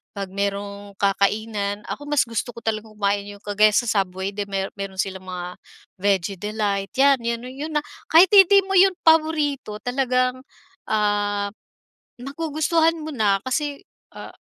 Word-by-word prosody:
'pag 195 -2 -5
merong 200 0 -4
kakainan, 205 +1 0
ako 290 0 -6
mas 295 -2 +3
gusto 230 +1 -4
ko 235 - -11
talagang 215 -1 -3
kumain 200 0 -1
yung 205 0 -11
kagaya 210 +1 +3
sa 240 - +3 0.2
Subway 190 +1 -3
di 200 0 -5
mer 195 -1 -3
meron 195 -1 -5
silang 190 0 -4
mga 180 -1 -6 0.4
Veggie 195 -1 0
Delight, 205 -1 -2
'yan 275 0 +4
'yon 235 0 -3
'no, 255 - -8
yun 295 +4 -6
na. 295 - +1 0.2
Kahit 345 +4 +6
hindi 395 0 +7
mo 385 - -8
'yon 380 0 +5
paborito 310 -7 +2
talagang, 255 0 0 0.5
ah, 205 -1 0 0.7
magugustuhan 320 +3 0
mo 310 0 -6
na 205 -4 +2
kasi, 285 +2 -2 0.3
ah, - - -9
215 Hz, 155 wpm, -22 LUFS, 200-280 Hz, 0.7 s, hindi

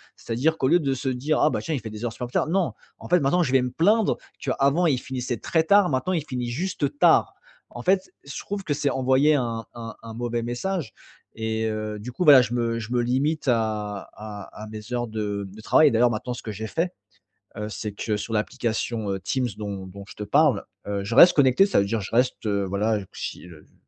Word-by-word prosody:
C'est - - -10
à - - -1
dire 160 +6 +1
qu'au 130 - +1
lieu 175 +3 +5
de 140 -4 0
se 135 +1 -2
dire: 140 +5 0
«Ah 155 - +5
bah - - -1
tiens, 160 - -2
il 135 - -3
fait 110 - -6
des 110 +2 -6
heures 115 - -3
supplémentaires», 125 +4 -2
non! 180 0 +1 0.3
En - - -10
fait, 180 - +5
maintenant, 160 +5 +2
je 135 - -1
vais 130 -1 +4
me 125 0 -2
plaindre 210 +5 +3 0.2
qu'avant, 140 +6 +1
il 135 -4 +2
finissait 125 -2 -4
très 160 -1 +1
tard, 200 +2 +5
maintenant, 130 +7 0
il 160 -5 0
finit 125 -4 -3
juste 145 -1 -2
tard. - - +5 0.4
En 120 - -8
fait, 190 0 +1
je 140 - -7
trouve 200 0 -5
que 150 - -1
c'est 140 0 0
envoyé 130 +3 +3
un 115 -4 -2
un 115 -1 -7
un 115 -1 -8
mauvais 120 0 -2
message. 130 - -3 0.4
Et 110 0 -2
heu, 110 -1 -3
du 125 +4 -7
coup, 180 - -2
voilà, 140 -4 +9
je 120 -1 -3
me 115 -1 0
je 110 0 -7
me 120 - +2
limite 135 +5 0
à 105 -4 -1
à 105 0 -9
à - - -7
mes 110 +2 -9
heures 120 0 -1
de 105 -2 -3
de 110 +3 -12
travail. 150 +6 +5
D'ailleurs, 120 +1 +4
maintenant, 120 +3 -3
ce 120 - -8
que 110 - -5
j'ai 110 +2 -5
fait, 175 +9 -1 0.6
heu, 105 0 -4
c'est 105 0 -5
que, 105 +1 -2
sur 110 +2 -4
l'application, 110 -1 -2
heu, 95 - -2
Teams 130 +3 -1
dont 100 -2 -5
dont 100 +2 -10
je - - -11
te 105 - -5
parle, 140 0 +3 0.2
heu, 100 -1 -2
je 110 +4 -3
reste 175 - +10
connecté. 135 +5 +5
Ça 200 - +3
veut 100 - +1
dire 110 +2 -1
je 95 - -7
reste, 125 -2 +1
voilà, 100 +2 0 0.2
si - - -6
heu, 80 -3 -14
j - - -32
120 Hz, 240 wpm, -24 LUFS, 110-145 Hz, 0.6 s, reste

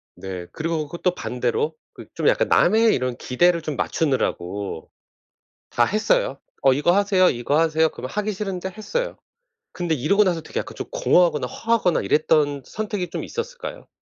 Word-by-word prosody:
네. 95 -2 -7
그리고 160 -1 -2
그 170 - -7
또 180 -1 +1
반대로 440 - -1 0.2
그 - - -11
좀 - - -1
약간 - - +3
남의 225 0 +4
이런 125 -1 -2
기대를 170 +8 +2
좀 155 -2 -4
맞추느라고 100 - -2 0.8
다 120 - +3
했어요. - - +1 0.2
"어 135 -1 +6
이거 145 +6 +2
하세요, 195 -2 +4
이거 120 +4 0
하세요." 160 0 +3
그러면 130 -2 -8
하기 210 0 -1
싫은데 190 -2 -4
했어요. 350 - -4 0.5
근데 175 -3 -1
이러고 160 +10 +3
나서 175 -4 0
되게 - - -4
약간 - - -6
좀 - - -6
공허하거나 175 - +3
허하거나 225 - +1
이랬던 145 -2 +2
선택이 205 -4 -4
좀 - - -4
있었을까요? 470 +1 -6
170 Hz, 365 characters per minute, -23 LUFS, 140-210 Hz, 0.8 s, 어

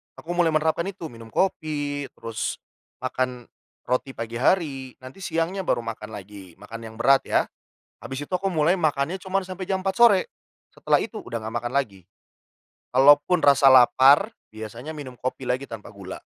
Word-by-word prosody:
Aku 165 - -8
mulai 175 -1 +2
menerapkan 160 +3 +1
itu, 180 -6 -7
minum 115 -1 -12
kopi 145 - -1
terus 115 -1 -4 0.5
makan 125 -1 -2 0.4
roti 125 +1 -2
pagi 115 +1 -5
hari. 135 -4 0
Nanti 130 +8 -11
siangnya 180 +2 -2
baru 120 - +1
makan 110 -2 -6
lagi, 100 -3 -11
makan 105 +3 -10
yang 110 - -12
berat 135 +4 +3
ya. - - +3 0.6
Habis 135 +2 -6
itu - - -21
aku 190 +2 -4
mulai 165 +3 +2
makannya 155 +2 0
cuman 190 +1 -1
sampai 185 0 -6
jam 190 0 -1
4 190 0 -1
sore. 220 -6 +6 0.5
Setelah - - +1
itu - - -6
udah 115 - -6
nggak 110 +1 -6
makan 120 0 -4
lagi. 100 -10 -2 0.9
Kalaupun 145 +6 +5
rasa 140 -1 +5
lapar, 135 - +6 0.2
biasanya 115 +8 -7
minum 130 -5 -9
kopi 130 +1 -4
lagi 130 +2 -1
tanpa 115 -4 -9
gula. 100 -2 -9
140 Hz, 165 wpm, -24 LUFS, 115-170 Hz, 0.9 s, sore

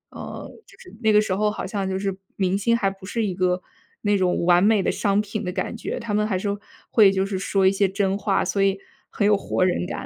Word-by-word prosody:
嗯， - - -7 0.2
就 - - -20
是 195 - -14
那 220 - +3
个 210 - +6
时 190 -3 -1
候 210 +1 +1
好 210 - -5
像 195 -1 -2
就 190 - -2
是 195 -1 -2 0.2
明 190 0 +1
星 230 +3 +2
还 195 -4 +1
不 195 0 -11
是 225 +3 -1
一 195 - -2
个 180 0 0 0.4
那 205 -1 +2
种 180 -2 +1
完 175 0 +5
美 210 -1 +4
的 - - +1
商 200 +1 +1
品 210 +1 -3
的 180 - -3
感 185 +4 -3
觉， 230 - -4
他 230 -3 -4
们 210 +1 +2
还 195 -4 -1
是 205 - -3 0.4
会 210 -4 +6
就 190 0 0
是 195 -1 -3
说 195 0 +2
一 - - +5
些 195 0 +1
真 195 0 0
话， 200 -2 0
所 195 +2 0
以 195 0 +1 0.3
很 205 - 0
有 210 - +5
活 185 -2 0
人 180 -1 0
感。 - - -5
195 Hz, 280 characters per minute, -23 LUFS, 190-210 Hz, 0.4 s, 个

